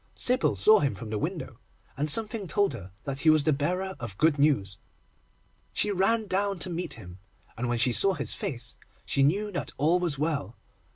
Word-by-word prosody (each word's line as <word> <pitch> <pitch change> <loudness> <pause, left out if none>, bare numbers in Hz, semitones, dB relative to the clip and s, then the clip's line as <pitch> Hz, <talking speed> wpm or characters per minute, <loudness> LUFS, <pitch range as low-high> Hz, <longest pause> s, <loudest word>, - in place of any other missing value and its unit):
Sybil 250 +1 +2
saw 215 0 +6
him 140 -2 0
from 115 -3 -8
the 105 - -2
window, 155 - -5 0.4
and 150 +2 -2
something 215 +2 0
told 200 -3 +1
her 95 -5 -9
that 135 -1 -4
he 160 - +3
was 155 -1 +5
the 155 - +3
bearer 180 +7 -2
of 110 -5 -7
good 155 -2 +2
news. 100 -11 +1 0.9
She 210 - +1
ran 215 +4 +2
down 200 0 0
to 180 - -1
meet 175 +1 -4
him, 90 -4 -12 0.4
and, 120 +2 -3
when 120 - 0
she 125 +1 +2
saw 195 +9 +4
his - - -1
face, 125 -2 -5 0.3
she 140 - +1
knew 200 +10 +2
that 175 - -4
all 160 +6 +3
was 170 -6 0
well. 145 -5 -2
155 Hz, 195 wpm, -27 LUFS, 125-190 Hz, 0.9 s, saw